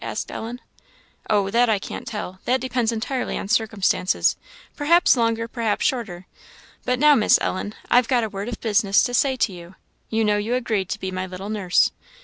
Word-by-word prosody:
asked - - -4
Ellen. 235 +2 -6 0.7
"Oh, 200 -2 +2
that 240 +2 +3
I 215 - +3
can't 195 - -7
tell; 200 -4 -6
that 255 +1 +2
depends 245 -2 -1
entirely 245 +3 -3
on - - -5
circumstances 210 -4 +1 0.4
perhaps 335 +3 +4
longer, 230 -1 0
perhaps 230 -3 -1
shorter. 195 -8 -2 0.6
But 250 0 +1
now, 300 +3 +6
Miss 225 -7 +5
Ellen, 205 +3 -3
I've 245 -1 +4
got 245 -3 +2
a 220 - -2
word 200 +3 -5
of 240 - -6
business 205 -3 +3
to 245 - -2
say 265 +2 +2
to 235 -5 0
you; 175 +1 -12 0.3
you 225 0 0
know 210 0 +2
you 220 +4 -1
agreed 220 -6 -1
to - - -3
be 190 - -4
my 185 0 -4
little 185 +2 -7
nurse. 195 -4 +2
220 Hz, 190 wpm, -22 LUFS, 195-245 Hz, 0.7 s, now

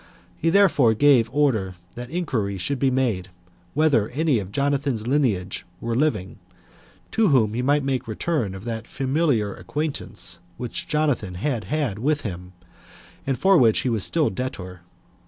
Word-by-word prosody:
He 165 - 0
therefore 165 - +4
gave 130 -3 +4
order 115 -11 +1 0.2
that 120 0 -7
inquiry 125 - -2
should 130 +9 -2
be 135 - +3
made, 115 -8 0 0.5
whether 145 -9 +3
any 150 -3 +1
of 95 -1 -7
Jonathan's 140 -3 0
lineage 115 -9 0 0.2
were 115 - -3
living, 110 -10 -1 0.7
to 225 -1 +3
whom 120 - +3
he 120 - -1
might 145 +3 +2
make 135 -3 -2
return 110 - -2
of 95 +3 -9
that 115 -2 -4
familiar 135 -7 0
acquaintance 150 0 -2 0.2
which 125 -2 -4
Jonathan 145 -12 0
had 115 +1 -2
had 125 -3 -2
with 150 +5 +1
him, 90 -3 -7 0.7
and 135 -2 0
for 190 -2 +5
which 115 -3 +4
he 130 - -1
was 110 -5 0
still 160 -3 +1
debtor. 90 -9 -5
125 Hz, 155 wpm, -23 LUFS, 105-145 Hz, 0.7 s, for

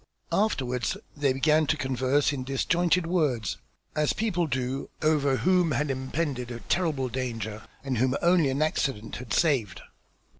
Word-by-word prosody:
Afterwards 125 - 0 0.2
they 145 -2 +2
began 150 +3 +3
to 155 - +1
converse 135 +2 +1
in 130 -2 -3
disjointed 170 +6 +1
words, 145 - 0 0.4
as 150 -1 +2
people 180 -6 0
do 130 -1 -2
over 145 -3 +3
whom 180 -2 +3
had 140 +3 0
impended 130 -1 -2
a 120 -1 -6
terrible 155 -7 0
danger 115 -4 -4 0.2
and 130 -4 -1
whom 130 +2 +2
only 170 -4 +4
an 135 +3 +1
accident 135 -8 -1
had 120 -2 -9
saved. 125 - +1
135 Hz, 145 wpm, -27 LUFS, 125-155 Hz, 0.4 s, only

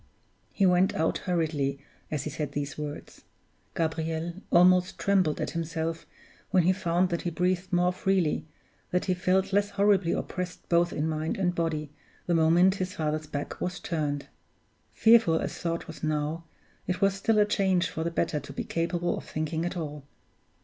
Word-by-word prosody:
He 200 - +2
went 180 +1 +3
out 160 - +1
hurriedly 155 -5 0 0.3
as 150 -3 -2
he 150 - -4
said 145 -1 -4
these 145 0 -3
words. 150 -1 -7 0.5
Gabriel 160 +1 -1 0.2
almost 180 +1 +5
trembled 190 -6 +2
at - - -2
himself 165 0 -3 0.4
when 185 -2 +4
he 185 +3 +4
found 180 -1 +1
that 170 -1 -2
he 175 - -2
breathed 180 +2 -1
more 180 0 +2
freely, 185 -5 0 0.4
that 180 - 0
he 185 - +2
felt 190 +1 +1
less 205 0 +3
horribly 200 -3 +3
oppressed 180 -1 -4
both 170 0 +3
in 150 +2 -1
mind 155 0 -2
and 180 -2 +1
body, 155 -3 -2 0.3
the 175 - 0
moment 170 +3 +5
his 185 0 -3
father's 155 0 -2
back 145 -1 -5
was 180 0 -2
turned. 145 -4 -2 0.7
Fearful 225 -7 +5
as - - -3
thought 170 -1 -2
was 160 - -10
now, 155 +2 -1 0.4
it 180 +1 -1
was 195 0 +3
still 215 +3 +1
a 210 - +6
change 190 -4 +2
for 160 - -4
the 170 - 0
better 165 -2 -1
to 140 0 -10
be 140 - -4
capable 170 +1 -1
of - - -12
thinking 160 +2 -2
at 175 +1 -3
all. 150 -3 -5
170 Hz, 175 wpm, -28 LUFS, 155-185 Hz, 0.7 s, a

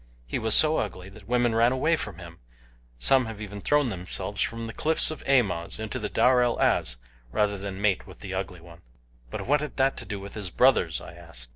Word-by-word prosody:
He - - -3
was 110 -1 +3
so 155 0 +5
ugly 95 -3 -4
that 100 0 -15
women 120 -1 +2
ran 115 +2 +4
away 145 +6 +2
from 105 - -6
him 85 -2 -11 0.6
some 130 - +4
have 110 -2 -7
even 105 -1 -7
thrown 145 0 +2
themselves 90 -4 -4
from 115 0 -2
the 115 - -7
cliffs 160 0 +3
of 155 - -7
Amoz 105 -12 +1
into 110 +3 -4
the 105 - -3
Darel 125 -1 +3
Az 60 -1 +1 0.3
rather 105 - +1
than 100 -1 -6
mate 100 -2 +1
with - - -12
the 95 -2 -7
Ugly 95 -2 -4
One." 85 0 -15 0.5
"But - - -5
what 145 +3 +2
had 150 - -6
that 135 0 +2
to - - -3
do 105 -2 -5
with 100 0 -9
his 105 -4 -4
brothers?" - - +3
I - - -10
asked. 60 -1 -7
105 Hz, 220 wpm, -26 LUFS, 95-125 Hz, 0.6 s, so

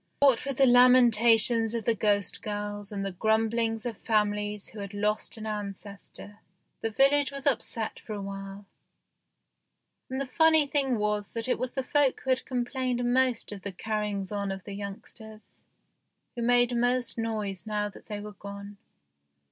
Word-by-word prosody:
What 270 -4 +4
with 275 -2 -3
the 270 - +5
lamentations 235 -2 +5
of 230 - -3
the 230 - +3
ghost 205 -3 0
girls 205 -1 -5
and 200 -1 -3
the 195 - -2
grumblings 225 +3 0
of 230 -4 -4
families 210 -1 -1
who 215 - -11
had 200 0 -7
lost 210 +3 -1
an 220 - -7
ancestor, 205 0 -7 0.4
the 225 - -1
village 275 +5 +3
was 275 -1 -7
upset 230 -4 0
for 215 - -8
a 205 - -5
while, 195 0 -7 1.4
and 260 +1 -3
the 275 - -1
funny 315 +3 +4
thing 275 -3 +1
was 210 -1 -2
that 230 0 -2
it 255 - 0
was 255 -1 -2
the 265 - -2
folk 280 0 +2
who 265 - -1
had 255 - +1
complained 245 -1 -1
most 255 -4 +1
of 205 -2 -7
the 200 - -5
carry 210 +2 -3
ings 195 -1 -4
on 200 -1 -2
of 190 -1 -6
the 200 - -8
youngsters, 215 +2 -9 0.7
who 240 - -4
made 245 +1 +3
most 245 0 0
noise 210 -5 -3
now 210 -1 -1
that 205 - -13
they 210 -2 -5
were 210 0 -8
gone. 200 0 -9
220 Hz, 170 wpm, -28 LUFS, 205-245 Hz, 1.4 s, the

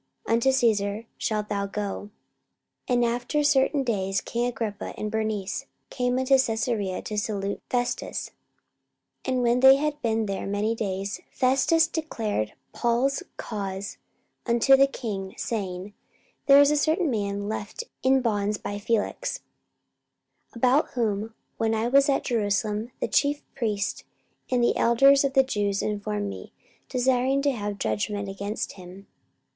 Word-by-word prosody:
unto 230 +4 +3
Caesar 220 -4 +1
shalt 210 -1 -2
thou 200 -1 -2
go. 205 0 -4 0.8
44:025:013 250 - +3
And 240 0 +3
after 245 +5 0
certain 280 0 +3
days 195 -5 0
king 235 +5 -2
Agrippa 225 -4 -4
and 210 0 -3
Bernice 215 -3 -2 0.2
came 250 0 0
unto 260 +1 +4
Caesarea 220 -5 -1
to 210 -1 -2
salute 200 -1 -3
Festus. 245 -1 -2 0.9
44:025:014 - - -3
And 250 - +1
when 240 +1 +3
they 265 +1 +8
had 295 +1 -2
been 225 -1 +1
there 195 -1 -3
many 205 +3 0
days, 200 -2 -3
Festus 270 +5 +3
declared 225 - -3 0.2
Paul's 245 +3 +1 0.2
cause 195 -1 -5 0.5
unto 235 +3 +5
the 275 +1 +5
king, 200 -8 -5
saying, 195 -3 -4 0.5
There 280 0 +8
is 285 0 +6
a 300 - +2
certain 315 +1 +1
man 200 -2 -2
left 215 - -4 0.2
in 265 0 +4
bonds 210 -3 0
by 205 0 -5
Felix: 230 - -1 1.1
44:025:015 - - -22
About 255 +5 +3
whom, 220 -2 -1 0.2
when 225 0 +1
I 220 +1 0
was 275 +3 +4
at 275 - +2
Jerusalem, 215 0 0
the - - -1
chief 290 +1 +1
priests 210 -6 -2 0.5
and 250 -2 +2
the - - +3
elders 275 +4 +5
of 275 -1 0
the 270 -1 +6
Jews 205 -6 -1
informed 210 0 -2
me, 195 - -8 0.4
desiring 260 +2 +2
to 285 - +3
have 205 -4 -4
judgment 200 - -2
against 200 +2 -4
him. 185 +1 -12
225 Hz, 145 wpm, -26 LUFS, 205-260 Hz, 1.1 s, they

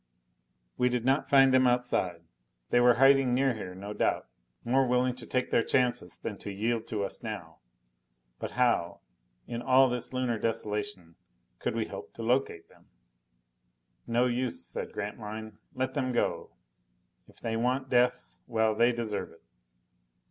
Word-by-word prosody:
We 125 - +4
did 125 -1 -1
not 135 +2 +2
find 135 -1 +6
them 130 -1 +5
outside. 120 -9 0 0.5
They 120 - +5
were 120 0 +6
hiding 135 -1 +5
near 135 0 +2
here, 95 -5 -7
no 100 +2 -6
doubt, - - 0 0.4
more 130 +2 +3
willing 125 0 +2
to 125 - -11
take 125 0 -1
their - - +4
chances 120 -8 0
than - - -6
to 100 - -6
yield 110 +3 -1
to 105 -3 -2
us 100 - -4
now. 100 -8 -7 0.8
But - - -5
how, 120 -9 +1 0.4
in 120 0 -5
all 130 +1 +5
this 125 -1 -3
Lunar 125 -3 -1
desolation, 105 -6 -3 0.4
could - - -2
we - - 0
hope - - -9
to 115 - -6
locate 120 -8 0
them? - - -23 1.2
"No 120 +1 +2
use," 125 0 -1
said - - -5
Grantline. 105 +1 -6 0.2
"Let 130 0 -1
them 130 0 -1
go. - - -1 0.8
If - - -19
they 115 -1 -3
want 130 +3 0
death, 125 0 +1
well, 110 -2 +2
they 120 +3 +4
deserve 115 -3 -3
it." 80 - -20
120 Hz, 155 wpm, -29 LUFS, 110-125 Hz, 1.2 s, find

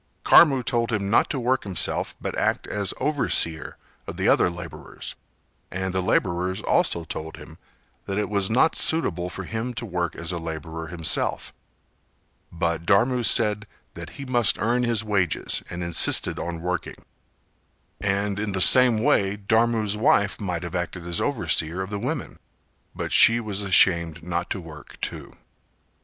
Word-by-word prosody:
Karmu 135 -6 +6
told 115 +1 -1
him 100 -3 -1
not - - +3
to 135 - -2
work 125 +2 0
himself 95 -3 -2
but - - -4
act - - 0
as 100 -2 -2
overseer 125 - 0 0.3
of - - -7
the - - 0
other - - +4
labourers, 85 -1 -8 0.6
and 95 0 -4
the 95 - 0
labourers 90 0 0
also 85 - +1
told 80 0 -7
him - - -13 0.5
that 95 - -3
it 105 -1 0
was 100 -2 0
not 130 +8 +3
suitable 90 - 0
for 95 0 -7
him 115 +4 -4
to 120 - -4
work 90 -4 -3
as 80 +1 -2
a 85 - -3
labourer 80 0 -6
himself, 85 -1 -1 1.0
but 85 -1 -2
Dharmu 125 +5 +3
said 105 -2 +2 0.3
that - - -8
he 140 - -7
must 120 -4 +2
earn 120 +3 +1
his 115 -3 0
wages 100 -7 0
and 85 +1 -5
insisted 85 -1 +1
on 85 -1 -5
working; 90 0 -3 1.0
and 100 0 -1
in 105 -2 -3
the 95 - -1
same 120 +2 +5
way 100 +1 +2
Dharmu's 110 0 +1
wife 100 -1 +2
might 90 -3 -3
have 85 0 -6
acted 90 -1 -4
as 85 -1 -2
overseer 85 +4 0
of 95 - -9
the 100 - -3
women, 130 +4 -4 0.6
but - - -4
she 115 +1 +7
was 105 -3 -3
ashamed 85 -4 +3
not 85 0 -3
to - - -3
work 80 -4 -12
too. - - -6
100 Hz, 160 wpm, -24 LUFS, 85-110 Hz, 1.0 s, she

